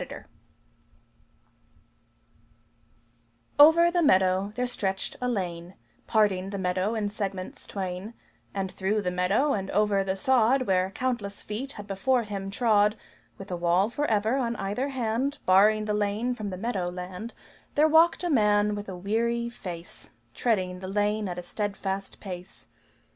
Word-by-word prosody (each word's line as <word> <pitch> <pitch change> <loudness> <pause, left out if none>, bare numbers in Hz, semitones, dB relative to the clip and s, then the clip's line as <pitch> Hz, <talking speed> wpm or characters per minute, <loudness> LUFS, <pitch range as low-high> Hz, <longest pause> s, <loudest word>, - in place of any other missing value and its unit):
Over 335 +3 +8
the 350 0 +2
meadow 190 - +3
there 250 - 0
stretched 195 -6 -2
a 250 - 0
lane, 180 -5 -4 0.3
Parting 195 -4 +2
the 200 - -4
meadow 185 +3 0
in 215 -2 -1
segments 195 -3 -5
twain; 190 +3 -5 0.4
And 190 -1 -3
through 205 +2 -1
the 180 - -1
meadow 195 +11 +2
and 195 -1 -3
over 210 -2 +2
the 190 0 -1
sod 255 +4 +3
Where 185 -4 +1
countless 220 -3 -3
feet 255 +7 -5
had 205 - -9
before 230 +6 +1
him 200 -2 -5
trod 210 -1 +3 0.4
With 195 -1 -9
a - - -1
wall 175 +5 +2
forever 230 -3 +1
on 235 -3 -1
either 210 +7 -2
hand 260 +2 -1
Barring 210 +3 +5
the 210 - -1
lane 210 +4 0
from 215 -4 -5
the 185 - -5
meadow 195 -4 -2
land, 180 +5 -7 0.4
There 300 +2 +5
walked 325 +3 +4
a 350 - 0
man 210 -4 +3
with 205 -1 -5
a 185 - -6
weary 235 +5 -1
face, 175 -7 -9 0.2
Treading 185 - 0
the 185 - -7
lane 205 +1 0
at 175 - -5
a 180 - -5
steadfast 195 0 -4
pace. 180 -2 -9
205 Hz, 150 wpm, -27 LUFS, 190-235 Hz, 0.4 s, Over